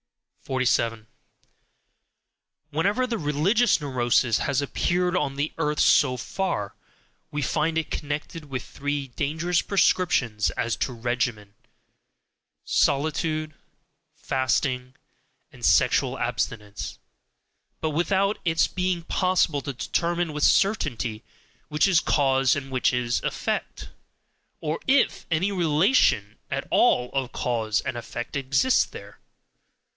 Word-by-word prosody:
47. 115 -4 0 1.7
Wherever 200 - +1
the 230 -3 -2
religious 180 +11 +2
neurosis 120 -5 +1
has 135 - 0
appeared 180 +5 0
on 145 -6 0
the 145 +2 -2
earth 150 -1 0
so 130 -3 +4
far, 115 - -3 0.6
we 145 -1 -3
find 160 +4 0
it 160 - -2
connected 150 +2 -4
with 130 -4 -5
three 145 -1 -4
dangerous 160 +7 0
prescriptions 150 - +2
as 115 - 0
to - - -1
regimen: 120 -3 -2 1.1
solitude, 155 +2 0 0.6
fasting, 130 0 -1 0.6
and - - -15
sexual - - +3
abstinence 105 - -3 0.8
but 155 - -1
without 195 +6 +1
its 165 -1 +2
being 180 -2 -2
possible 180 -5 +1
to 140 - -4
determine 170 +5 -1
with 150 - -2
certainty 120 - +1 0.4
which 150 +5 +2
is 185 -4 +4
cause 135 -4 +2
and 135 -1 -5
which 130 -2 +2
is 120 -1 0
effect, - - -3 0.7
or 155 +1 -2
IF 265 -1 +2
any 175 +5 +1
relation 160 - +2
at - - -3
all 125 0 +3
of 135 -2 -1
cause 110 -3 -1
and 130 - -4
effect 120 +1 -6
exists 140 - +2
there. - - -11
145 Hz, 110 wpm, -25 LUFS, 125-170 Hz, 1.7 s, so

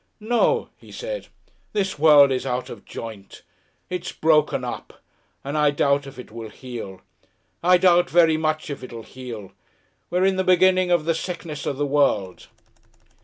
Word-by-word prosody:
"No," 240 - +1
he - - -16
said. - - -6 0.5
"This 195 -7 -1
world 145 -3 +7
is 130 - -1
out 125 0 -3
of - - -11
joint. 110 -4 -9 0.4
It's 180 -1 -4
broken 155 -1 +2
up, - - -7 0.4
and 140 +2 -4
I 150 -1 +4
doubt 140 0 +1
if 135 - -11
it 125 - -10
will 115 -1 -8
heal. 110 -7 -8 0.6
I 180 +1 +5
doubt 175 -2 +4
very 165 +1 +4
much 155 -1 -1
if 140 - -6
it'll 115 -2 -8
heal. 115 -7 -9 0.6
We're 180 +2 +1
in 190 -1 +2
the 190 - +1
beginning 185 0 +4
of 175 -3 +2
the 165 - +2
Sickness 165 -3 -5
of 140 - -2
the 145 - 0
World." 135 -10 0
150 Hz, 165 wpm, -23 LUFS, 130-180 Hz, 0.6 s, world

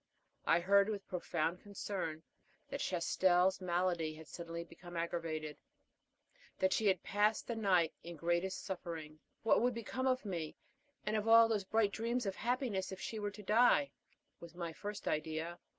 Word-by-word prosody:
I 170 - +5
heard 200 +3 +5
with 205 -2 -4
profound 170 -1 -1
concern 190 -6 -4 0.5
that - - -4
Chastel's 180 +1 +2
malady 175 -3 0
had 160 0 -11
suddenly 170 +2 -6
become 175 +1 -10
aggravated; 165 -3 -3 1.0
that 190 0 +2
she 220 - +2
had 190 -3 +2
passed 210 +2 +2
the 235 - -3
night 185 -7 +3
in 170 0 -8
the - - -17
greatest 175 +3 0
suffering. 165 -5 -6 0.2
What 225 - +4
would 245 0 +2
become 255 +3 -2
of 255 -2 +1
me, 170 -6 -3 0.5
and 210 +1 0
of 215 0 0
all 230 0 +8
those 210 -4 0
bright 215 0 +2
dreams 235 +3 -1
of 195 -1 -2
happiness, 235 -6 -1
if 190 - -6
she 220 - -4
were 205 -1 -1
to 205 +1 -11
die? 240 +7 +4 0.5
was 170 0 -11
my 170 -2 -4
first 205 +4 -6
idea. 160 +2 -2
185 Hz, 165 wpm, -36 LUFS, 170-210 Hz, 1.0 s, all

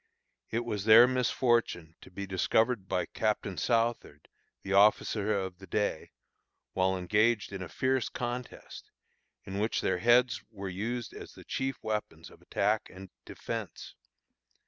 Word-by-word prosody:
It 120 +1 -2
was 105 -4 -3
their 115 +2 +9
misfortune 120 -9 0
to - - -14
be 100 +2 -6
discovered 100 +3 +1
by 90 -1 -1
Captain 105 0 -2
Southard, 115 - -1 0.3
the 100 - -3
officer 105 +1 +3
of 95 -3 -2
the 95 - -12
day, 100 -3 -2 0.6
while 95 0 +1
engaged 105 +4 +1
in 95 - -5
a 90 - -6
fierce 130 -2 0
contest, 125 0 -6 0.5
in 95 +1 -5
which 110 +2 0
their 95 -1 0
heads 120 -1 +4
were 100 -3 -7
used 110 +5 -4
as - - -10
the - - -13
chief 135 -1 -3
weapons 110 -1 -4
of - - -18
attack - - 0
and 95 0 -12
defence. - - -6
105 Hz, 145 wpm, -30 LUFS, 95-120 Hz, 0.6 s, their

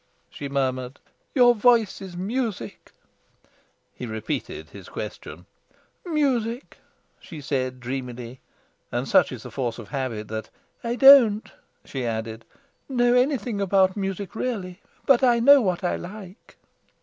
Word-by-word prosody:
she 140 - -7
murmured. 130 -1 -2 0.4
"Your 245 -2 +6
voice 230 -3 +3
is 185 -2 -8
music." 210 - -4 1.0
He 125 - -7
repeated 110 -8 -5
his - - -12
question. 85 +4 -8 0.6
"Music!" 265 -7 -1 0.4
she 160 - -10
said 130 -3 -2
dreamily; 125 -1 -6 0.5
and - - -2
such - - +4
is - - -8
the - - -9
force 120 -4 -3
of 110 -4 -10
habit 115 -5 -4
that 110 0 -5 0.3
"I 235 0 -1
don't," 250 -6 +7 0.3
she 130 -2 -5
added, 110 -1 -4 0.4
"know 245 -2 +3
anything 250 -5 +1
about 190 -1 +3
music, 195 -1 -4
really. 200 -7 -4 0.2
But 270 -1 +4
I 240 -2 +4
know 280 +3 +7
what 185 -4 -1
I 175 - 0
like." 195 +2 -11
190 Hz, 130 wpm, -24 LUFS, -, 1.0 s, don't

